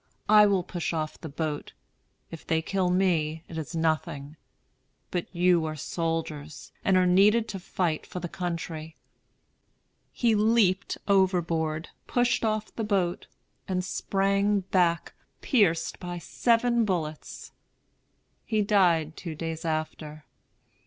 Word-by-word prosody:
I 210 0 +7
will 195 -3 +2
push 175 -2 -3
off 155 -1 -3
the 160 - -6
boat. 150 0 -4 0.6
If 165 - -9
they 160 -1 +1
kill 190 0 0
me, 165 -4 +1
it 165 - -9
is 160 0 -5
nothing; 155 -2 -1 0.8
but 175 -2 -2
you 175 -1 +3
are 155 0 -3
soldiers, 155 -1 -4
and 190 -1 +3
are 185 - +4
needed 205 +5 +4
to 195 - -5
fight 175 -3 -2
for 180 - -6
the 175 - -4
country." 165 -3 -5 1.2
He 235 -2 +2
leaped 210 -3 +2
overboard, 170 -5 +1 0.2
pushed 245 -1 +1
off 215 -1 -1
the 225 - -2
boat, 190 -5 0 0.4
and 185 -1 -1
sprang 195 +2 +1
back, 180 -3 +1 0.3
pierced 200 - +1
by 175 0 -5
seven 235 +6 +2
bullets. 160 -7 -4 0.9
He 215 -2 0
died 175 -6 +3
two 165 -3 -6
days 165 0 -5
after. 155 -1 -4
175 Hz, 125 wpm, -27 LUFS, 160-195 Hz, 1.2 s, I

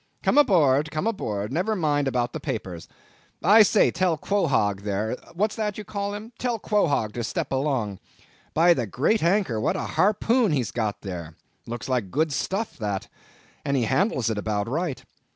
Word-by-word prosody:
Come - - +4
aboard, 155 - +4
come 155 +4 -3
aboard; 110 - -2
never 185 +7 0
mind 145 -6 +1
about 125 -2 -1
the 160 - -4
papers. 105 - -5 0.6
I 210 +6 +7
say, 210 0 +4
tell 175 -2 +1
Quohog 135 - +1
there—what's 110 - -2
that 210 -2 -2
you 210 - -5
call 200 0 -4
him? 215 +3 -8
tell 245 -2 -1
Quohog 165 - +1
to 120 - -3
step 110 - -3
along. 130 -8 -1 0.6
By 170 +3 +6
the 125 -8 -2
great 150 - +1
anchor, 170 - +1
what - - +1
a - - -2
harpoon 215 +1 +2
he's 130 -6 -1
got 110 -4 -2
there! 85 -5 -7 0.3
looks 120 0 -5
like 125 -7 -1
good 155 - 0
stuff 195 - -3
that; 105 -3 -3 0.5
and 140 0 0
he 125 - +1
handles 125 - +1
it 105 - -2
about 105 0 -2
right. 150 +1 -2
145 Hz, 170 wpm, -25 LUFS, -, 0.6 s, I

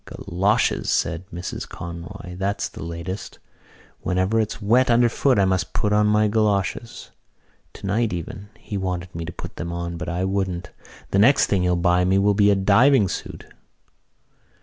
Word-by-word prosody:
"Goloshes!" 95 +5 0
said 85 +2 -1
Mrs 90 +2 -6
Conroy. 85 +1 -8
"That's 100 +2 -2
the - - -11
latest. 85 +4 -6 0.6
Whenever 95 +5 0
it's 110 -1 -2
wet 120 +5 +3
underfoot 120 +2 +3
I 100 - +4
must 95 -2 -1
put 105 0 0
on 105 0 +3
my 105 0 +3
goloshes. 105 +1 -1 0.6
Tonight 105 +3 -1
even 90 +4 -6
he 100 - -6
wanted 90 -2 -3
me 85 0 -5
to 85 - -6
put - - -9
them 85 0 -4
on, 85 0 -4
but 90 - -5
I 90 +2 -1
wouldn't. 95 -2 -2 0.4
The 100 - +2
next 130 +7 +5
thing 100 -3 +1
he'll 90 0 +2
buy 90 +1 +2
me 95 +1 +2
will 100 +1 +3
be 100 0 +4
a 100 - +4
diving 105 +3 +4
suit." - - -6
95 Hz, 165 wpm, -23 LUFS, 90-105 Hz, 0.6 s, next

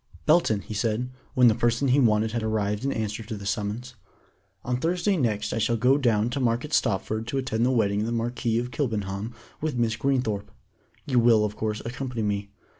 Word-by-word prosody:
"Belton," 150 -10 +3
he 110 - -8
said, 115 +3 -1 0.2
when 125 -2 +6
the 115 - +6
person 120 +4 +1
he 135 +3 +4
wanted 110 -3 +3
had 115 0 -2
arrived 105 -1 -1
in 140 - 0
answer 110 -2 -3
to 110 0 -6
the 100 - -9
summons, 105 +4 -3 0.7
"on 125 0 0
Thursday 180 +8 +1
next 110 - 0
I - - -1
shall 115 +2 +1
go 130 +5 +4
down 115 -3 +2
to 140 - -2
Market 125 +4 0
Stopford 110 +1 0
to 135 - -2
attend 120 -4 0
the 125 - +3
wedding 105 -5 +2
of 105 - 0
the - - -2
Marquis 120 0 -1
of 120 +1 -2
Kilbenham 110 -3 -3 0.3
with 155 -3 -1
Miss 115 -2 +1
Greenthorpe. 115 -5 -1 0.6
You 130 -4 +2
will, 115 -2 +5
of 105 0 -4
course, 110 -1 -3
accompany 125 -1 -4
me. 100 -1 -2
115 Hz, 200 wpm, -26 LUFS, 105-125 Hz, 0.7 s, when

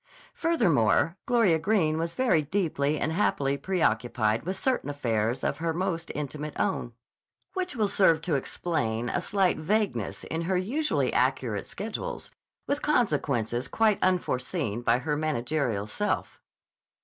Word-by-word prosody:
Furthermore, 165 - +2
Gloria 225 -10 +4
Greene 160 -4 +1
was 165 +1 -2
very 245 -11 +3
deeply 155 -3 0
and 155 - 0
happily 140 -6 +1
preoccupied 120 - 0
with 190 - -2
certain 260 - 0
affairs 115 -4 -1
of 140 - 0
her 165 0 -1
most 175 -2 -2
intimate 150 +1 -5
own, 185 - -1 0.6
which 370 -4 -2
will 215 -3 +2
serve 190 -5 +4
to 165 -1 -1
explain 120 -5 -1
a 175 - -1
slight 195 -1 +1
vagueness 155 - -1
in 160 - -3
her 190 - +2
usually 275 +12 0
accurate - - 0
schedules, - - -5 0.3
with 285 +1 -1
consequences 140 - +1
quite 220 -2 +2
unforeseen 135 - 0
by 120 0 +3
her 150 +4 -1
managerial 140 -7 -1
self. 205 - -2
160 Hz, 135 wpm, -27 LUFS, 130-195 Hz, 0.6 s, Gloria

